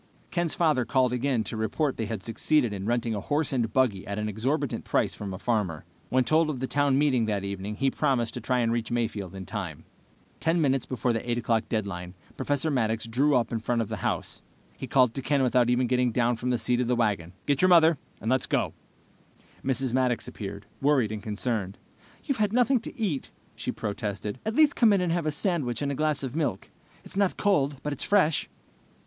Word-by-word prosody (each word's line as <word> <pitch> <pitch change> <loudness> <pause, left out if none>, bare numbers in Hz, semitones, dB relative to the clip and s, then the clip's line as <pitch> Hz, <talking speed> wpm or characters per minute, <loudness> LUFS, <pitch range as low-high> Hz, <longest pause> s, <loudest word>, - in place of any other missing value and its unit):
Ken's 175 -2 0
father 155 -7 +2
called 125 +1 +2
again 125 -2 0
to 115 - -5
report 120 +7 0
they 110 - -2
had 105 -2 -4
succeeded 120 0 +1
in 100 0 -4
renting 120 -1 0
a 105 - -2
horse 145 +4 0
and 115 -4 0
buggy 110 -7 +1
at 100 0 -3
an 105 0 -1
exorbitant 130 +7 -1
price - - +1
from 100 -2 -6
a 95 - -5
farmer. 95 -9 -1 0.2
When 130 0 +3
told 155 +6 +3
of 140 -5 -3
the 130 - -1
town 140 0 +2
meeting 135 -5 +3
that 100 -2 -1
evening, 100 +1 -4
he 135 +4 +1
promised 130 -6 0
to 125 - -5
try 125 +1 +1
to 115 - +1
reach 115 -1 -1
Mayfield 110 -6 -2
in 95 -1 -7
time. 95 -6 -5 0.6
Ten 165 +2 +2
minutes 135 -4 +1
before 125 -1 0
the 115 +2 -3
8 120 - +1
o'clock 115 -2 0
deadline, 95 -5 -3 0.2
Professor 145 +2 0
Maddox 115 -4 0
drew 135 +6 +2
up 120 -2 +1
in 115 - -1
front 120 +2 -1
of 115 - -1
the - - -3
house. - - -3 0.3
He - - -7
called 125 -3 +4
to 135 - -3
Ken 135 +1 +1
without 125 -1 +3
even 125 +1 +3
getting 125 0 +2
down 120 +1 +2
from 125 +2 -3
the 125 - +2
seat 125 +1 0
of 125 - -1
the 125 - +2
wagon. 100 -7 0
"Get 140 -2 +1
your 185 - +5
mother, 165 -4 +6 0.2
and 110 - -2
let's 130 -1 +1
go!" - - 0 0.9
Mrs. 130 -1 0
Maddox 125 -2 +1
appeared, 100 -1 -7 0.2
worried 135 -6 +3
and 110 -1 -4
concerned. 105 -2 -2 0.5
"You've 275 -6 -2
had 210 0 +1
nothing 250 +1 +4
to 230 - -10
eat," 180 -12 -1 0.3
she - - -3
protested. 105 +1 -4
"At 220 - -1
least 305 -1 +5
come 225 -4 +5
in 195 - +2
and 180 -2 0
have 170 -2 0
a - - +3
sandwich 150 - 0
and 140 - 0
a - - -1
glass 150 0 0
of 130 0 -4
milk. 140 - -2 0.3
It's - - -8
not 200 -2 +1
cold, 145 -9 +2
but 150 - -2
it's 140 - -3
fresh." 185 -7 +2
125 Hz, 220 wpm, -27 LUFS, 110-145 Hz, 0.9 s, mother